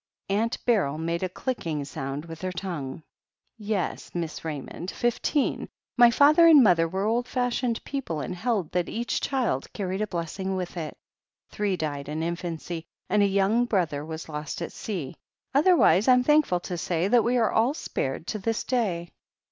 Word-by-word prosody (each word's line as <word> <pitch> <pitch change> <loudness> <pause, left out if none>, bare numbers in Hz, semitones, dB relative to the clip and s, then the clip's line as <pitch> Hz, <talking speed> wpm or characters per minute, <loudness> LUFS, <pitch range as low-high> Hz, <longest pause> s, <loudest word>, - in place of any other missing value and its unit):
Aunt 220 +4 +1
Beryl 195 - +2
made 170 +1 -2
a 185 - -1
cUcking 170 - -3
sound 140 +2 -5
with 165 -1 -9
her 185 0 -2
tongue. 170 -6 -5 0.5
"Yes, 210 -4 -3
Miss 165 -2 -3
Ra)rmond, 160 +3 -6
fifteen. 240 +6 0 0.3
My 240 -1 +8
father 295 +7 +6
and 300 -5 +8
mother 170 -5 +4
were 190 +4 -2
old 235 +3 +1
fashioned 245 -2 -1
people, 270 - -4
and 165 - -4
held 205 -4 -1
that 180 -1 0
each 235 +1 -2
child 250 - -1
carried 190 -1 -3
a 215 - 0
blessing 190 +2 -3
with 180 -1 -4
it. 160 -4 -5 0.5
Three 205 -3 -1
died 145 -3 -3
in 155 +2 -2
in 170 +1 -1
fancy, 170 -1 -6 0.2
and 210 +1 +4
a 200 - +5
young 200 +5 +2
brother 170 -10 0
was 160 +1 -7
lost 150 -1 -5
at - - -5
sea. 175 -8 -5 0.4
Other 340 +6 +5
wise 200 - +4
Fm 250 -1 +5
thankful 295 -12 +3
to 175 -1 -4
say 175 +1 0
that 235 +1 +4
we 245 +1 +2
are 225 -3 +2
all 235 +6 +2
spared 135 - -3
to 215 - -2
this 225 +2 -1
day." 190 -9 -1
190 Hz, 180 wpm, -26 LUFS, 165-235 Hz, 0.5 s, My